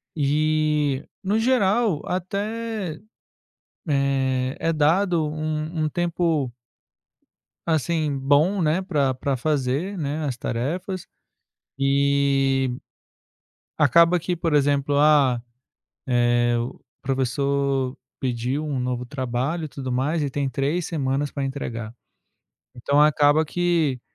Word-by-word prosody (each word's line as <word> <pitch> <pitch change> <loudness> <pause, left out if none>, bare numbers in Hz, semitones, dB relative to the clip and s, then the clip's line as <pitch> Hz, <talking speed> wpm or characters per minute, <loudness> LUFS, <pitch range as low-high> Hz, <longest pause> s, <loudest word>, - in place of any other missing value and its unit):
E 150 -1 +1 0.2
no 205 +3 0
geral, 225 - +2
até, 200 0 -3 0.9
eh, 135 -2 +1
é 165 - +1
dado 165 +2 +2
um 155 +1 -3
um 155 - +1
tempo 165 -4 0 1.2
assim, 155 -2 0
bom, 145 +9 +3
né 165 +3 +1
pra 145 -8 0
pra 135 +1 -2
fazer, 150 +7 -1
né, 150 -1 -3
as 130 - -2
tarefas. 170 +11 -3 0.7
E 140 -1 +2 1.1
acaba 170 +1 +5
que, 175 +1 -2
por 165 -1 -1
exemplo, 145 0 +2
ah, 140 -5 +4 0.6
eh, 120 -1 +2
o 120 +1 -5 0.2
professor 135 0 0 0.2
pediu 125 +3 -2
um 145 -3 -2
novo 125 0 -2
trabalho 130 +5 -2
e 155 - -5
tudo 130 -2 -6
mais 145 +6 0
e 145 - -1
tem 140 0 -1
3 140 +7 -1
semanas 140 -2 -1
para 140 - -3
entregar. 120 -5 -5 0.8
Então 140 +4 +1
acaba 150 +1 +4
que, 165 -5 0
145 Hz, 110 wpm, -23 LUFS, 135-165 Hz, 1.2 s, acaba